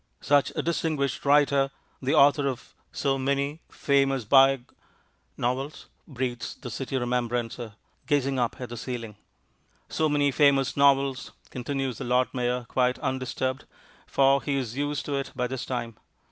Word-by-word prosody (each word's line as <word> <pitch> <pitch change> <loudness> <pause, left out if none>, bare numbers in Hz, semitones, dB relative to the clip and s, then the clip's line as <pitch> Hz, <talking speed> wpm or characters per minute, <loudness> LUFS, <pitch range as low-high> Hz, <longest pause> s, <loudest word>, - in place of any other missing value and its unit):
"Such 145 -1 +3
a - - -1
distinguished 155 -6 -1
writer. 140 -1 +4 0.3
The 135 +1 +1
author 140 0 +5
of 130 -3 -5 0.2
so 135 -1 0
many 140 +3 -1
famous 135 -3 +1
biog 135 +1 +4 0.3
" - - -42
"Novels," 135 +4 -4 0.2
breathes 125 -3 -4
the 125 - -8
City 135 +3 -3
Remembrancer, 120 -2 -2 0.3
gazing 140 -3 +1
up 120 -1 -1
at 125 -2 -6
the 120 - -7
ceiling. 115 -3 -5 0.7
"So 155 -1 +1
many 145 -1 +2
famous 140 -1 +3
novels," 140 -2 +2 0.2
continues 130 -1 -3
the - - -4
Lord 125 +1 +1
Mayor 125 -1 -1
quite 125 -1 +1
undisturbed, 130 0 -2 0.4
for 135 0 +3
he 145 - -1
is 125 -4 -3
used 145 +1 -2
to 145 - -2
it 135 - -4
by 125 -1 0
this 130 +1 -4
time. 120 -3 -3
135 Hz, 150 wpm, -26 LUFS, 125-140 Hz, 0.7 s, author